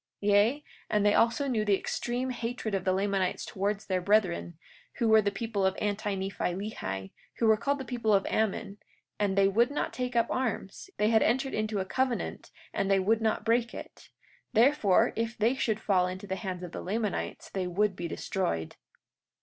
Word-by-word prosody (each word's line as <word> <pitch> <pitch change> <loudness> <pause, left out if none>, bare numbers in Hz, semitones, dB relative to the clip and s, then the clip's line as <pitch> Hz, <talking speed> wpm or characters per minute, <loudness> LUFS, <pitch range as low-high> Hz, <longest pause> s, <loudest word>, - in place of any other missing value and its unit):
43:11 205 - +3
Yea, 225 +9 +3 0.3
and 210 -1 +2
they 205 - +5
also 235 +6 +2
knew 230 -5 +1
the 205 -2 +3
extreme 245 +5 -2
hatred 235 -2 -4
of 190 -2 -1
the 185 - +3
Lamanites 195 -1 0
towards 200 +2 -2
their 185 -2 0
brethren, 180 -4 +1 0.4
who 235 - 0
were 220 0 +6
the 205 - +1
people 200 0 -3
of 190 0 +1
Anti 205 -1 -1
Nephi 190 -2 -2
Lehi, 95 - -5 0.3
who 230 - +1
were 220 -1 +6
called 280 +6 -1
the 265 - -6
people 240 -3 -1
of 195 -1 +3
Ammon—and 205 -1 -3
they 195 0 +5
would 230 +5 +3
not 290 - -2
take 250 -1 -3
up 230 -1 +4
arms, 245 - -3
yea, 210 - +2
they - - +4
had 220 -1 +5
entered 265 +4 +1
into 215 0 -1
a 190 - -1
covenant 255 +4 -2 0.2
and 195 - -1
they 195 0 +4
would 220 +4 +2
not 220 -1 0
break 235 +1 +1
it—therefore, 235 -4 0
if 230 +1 -2
they 225 +4 +3
should 220 -5 -1
fall 185 -4 +2
into 185 +2 -6
the 190 -1 -3
hands 185 -3 -5
of 175 - -6
the - - -6
Lamanites 210 +2 -3
they 185 -2 -2
would 195 +2 +1
be 170 -1 -4
destroyed. 85 - -3
210 Hz, 195 wpm, -29 LUFS, 195-230 Hz, 0.4 s, were